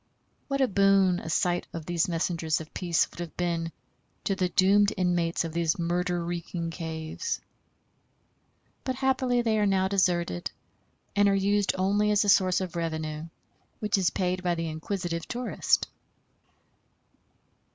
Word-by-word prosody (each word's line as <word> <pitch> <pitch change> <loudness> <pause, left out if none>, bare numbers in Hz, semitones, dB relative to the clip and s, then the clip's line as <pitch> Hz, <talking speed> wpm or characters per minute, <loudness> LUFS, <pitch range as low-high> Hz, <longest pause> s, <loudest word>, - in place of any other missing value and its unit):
What 275 -1 -1
a 265 - +4
boon 195 -3 +4
a - - -7
sight 175 +2 +1
of 165 -2 -6
these 175 0 0
messengers 165 -2 0
of 160 -1 -10
peace 175 -3 +1
would - - -13
have 175 -2 -6
been 170 -2 -1 0.5
to 195 - 0
the 185 -2 0
doomed 200 +3 +4
inmates 175 -2 +1
of 165 - -5
these 165 -2 +1
murder 175 0 -1
reeking 170 -1 -4
caves. 160 - -4 1.4
But 260 - -2
happily 260 -2 +1
they 220 -2 +2
are 205 - +3
now 190 -1 +2
deserted, 175 - +1 0.7
and 205 0 +5
are 195 - +3
used 200 +1 +2
only 200 +3 +2
as 210 0 +3
a - - +1
source 185 -1 +4
of 180 -2 -5
revenue, 160 -1 -3 0.5
which 210 -1 0
is 190 -3 +2
paid 185 0 -1
by 175 -1 0
the 165 -1 -3
inquisitive 170 +1 -3
tourist. 245 0 0
180 Hz, 150 wpm, -28 LUFS, 165-200 Hz, 1.4 s, and